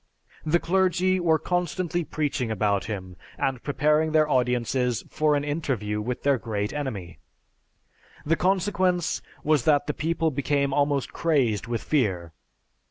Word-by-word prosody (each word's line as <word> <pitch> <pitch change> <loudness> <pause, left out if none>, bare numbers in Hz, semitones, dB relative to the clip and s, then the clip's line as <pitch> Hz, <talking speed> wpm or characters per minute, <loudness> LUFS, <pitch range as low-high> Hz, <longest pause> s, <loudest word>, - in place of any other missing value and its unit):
"The 155 +2 +3
clergy 185 +1 +2
were 165 -2 +3
constantly 175 0 -1
preaching 145 -6 -2
about 100 -2 0
him, 95 -4 -6 0.2
and 130 -3 -1
preparing 150 +2 +1
their 155 -1 +4
audiences 125 -2 0
for 155 -1 +2
an 145 - 0
interview 130 -9 -2
with 120 +3 -4
their 140 -3 +3
great 105 -3 -3
enemy. 100 - -5 1.1
The 165 +3 +2
consequence 185 -2 +1 0.2
was 150 -4 +2
that 145 -2 +4
the 150 - -2
people 160 +1 0
became 140 0 0
almost 145 -1 0
crazed 130 -10 +1
with 120 -1 -3
fear. 95 - 0
145 Hz, 135 wpm, -25 LUFS, 120-160 Hz, 1.1 s, their